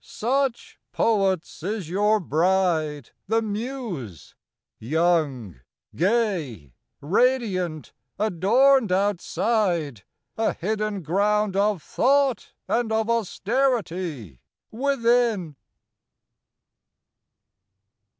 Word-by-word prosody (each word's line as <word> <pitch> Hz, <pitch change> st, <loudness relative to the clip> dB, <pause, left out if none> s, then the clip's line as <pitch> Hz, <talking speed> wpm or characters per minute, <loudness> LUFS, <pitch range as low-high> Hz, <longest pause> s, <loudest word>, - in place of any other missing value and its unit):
Such, 260 Hz, +2 st, -2 dB
poets, 195 Hz, -8 st, 0 dB
is 200 Hz, 0 st, -3 dB
your 205 Hz, +5 st, +2 dB
bride, 160 Hz, -, 0 dB, 0.2 s
the 225 Hz, +1 st, +2 dB
Muse! 210 Hz, -, -5 dB, 0.5 s
young, 140 Hz, -, 0 dB, 0.4 s
gay, 170 Hz, -, -1 dB, 0.3 s
Radiant, 185 Hz, -, 0 dB, 0.2 s
adorned 220 Hz, +5 st, +3 dB
outside; 185 Hz, -, 0 dB, 0.4 s
a 225 Hz, -, +1 dB
hidden 210 Hz, 0 st, -3 dB
ground 205 Hz, +4 st, +1 dB
Of 200 Hz, -3 st, +1 dB
thought 275 Hz, 0 st, +1 dB, 0.2 s
and 235 Hz, -1 st, 0 dB
of 220 Hz, +1 st, +1 dB
austerity 185 Hz, -, -1 dB, 0.3 s
within. 235 Hz, -, +1 dB
200 Hz, 70 wpm, -24 LUFS, 165-230 Hz, 0.5 s, adorned